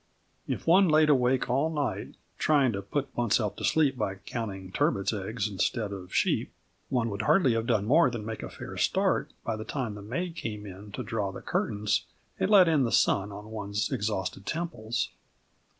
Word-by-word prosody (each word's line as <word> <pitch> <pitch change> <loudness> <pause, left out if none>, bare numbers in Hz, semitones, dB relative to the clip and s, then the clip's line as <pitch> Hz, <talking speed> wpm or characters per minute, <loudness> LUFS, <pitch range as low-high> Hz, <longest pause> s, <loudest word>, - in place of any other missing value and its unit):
If - - -3
one 185 +3 +6
lay 155 0 +6
awake 130 -4 +3
all 135 +6 +1
night, 150 -4 -3 0.2
trying 140 -5 +3
to 100 -2 -3
put 135 +7 -3
oneself 115 -3 +1
to - - -7
sleep 150 -4 +3
by 100 -3 -1
counting 95 -2 -6
turbots' 100 +2 +1
eggs 105 +1 -2
instead 105 +1 -1
of 90 -2 -8
sheep, - - +1 0.4
one 115 -3 0
would 100 +1 -3
hardly 130 - +4
have 115 0 -1
done 110 -4 +2
more 145 +5 +5
than 115 -4 -5
make 110 0 -5
a - - -6
fair - - -8
start - - +1
by 115 - -1
the 110 - -5
time 120 -2 -3
the 105 - -8
maid 165 - -3
came 105 -8 -5
in 100 +1 -10
to - - -4
draw 105 -4 -2
the - - -8
curtains 105 0 -1 0.3
and - - +1
let 195 -4 +7
in 155 -3 +3
the 115 - 0
sun 100 +1 +3
on 105 +2 -9
one's 105 +1 -2
exhausted 100 -5 -2
temples. 135 -9 -2
110 Hz, 190 wpm, -28 LUFS, 100-135 Hz, 0.4 s, let